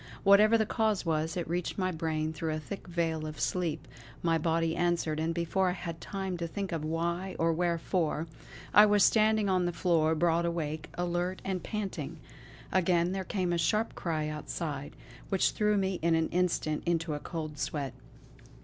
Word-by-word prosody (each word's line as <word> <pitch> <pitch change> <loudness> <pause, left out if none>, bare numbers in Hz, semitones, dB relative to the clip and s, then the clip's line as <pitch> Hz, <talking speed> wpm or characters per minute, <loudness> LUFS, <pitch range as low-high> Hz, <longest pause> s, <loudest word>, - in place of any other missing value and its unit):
Whatever 210 +3 +6
the 220 - +2
cause 215 -3 0
was, 160 +1 0
it 175 - -2
reached 175 +1 -2
my 185 -1 0
brain 160 -1 -2
through 160 0 -2
a - - -3
thick 195 +6 -8
veil 165 -2 -1
of 155 -1 -7
sleep; 165 -4 -1 0.4
my 165 -1 +3
body 165 0 +1
answered, 170 -3 0
and 160 +1 0
before 170 +3 +1
I - - 0
had 170 -2 -6
time 190 -2 -4
to 170 0 -3
think 195 +3 -4
of 165 -2 -2
why 170 +4 -2
or 165 0 +2
wherefore, 170 -1 0 0.5
I 210 +2 +9
was 205 -1 +4
standing 215 +1 +4
on 185 -2 +2
the - - 0
floor 165 -2 +2
broad 170 +1 +2
awake, 160 -3 -3
alert 175 +1 -1
and 190 -2 -1
panting. 210 -2 -4 0.5
Again 175 -1 +2
there 190 0 -2
came 185 -2 -1
a 170 - 0
sharp 215 +8 +1
cry 155 -4 -2
outside, 150 -1 -4 0.3
which 195 - +2
threw 210 -1 +2
me 190 -1 0
in 165 0 +3
an 160 0 +1
instant 170 -3 0
into 165 -2 0
a 145 - -3
cold 155 -2 -5
sweat. 140 -2 -2
170 Hz, 180 wpm, -30 LUFS, 160-185 Hz, 0.5 s, I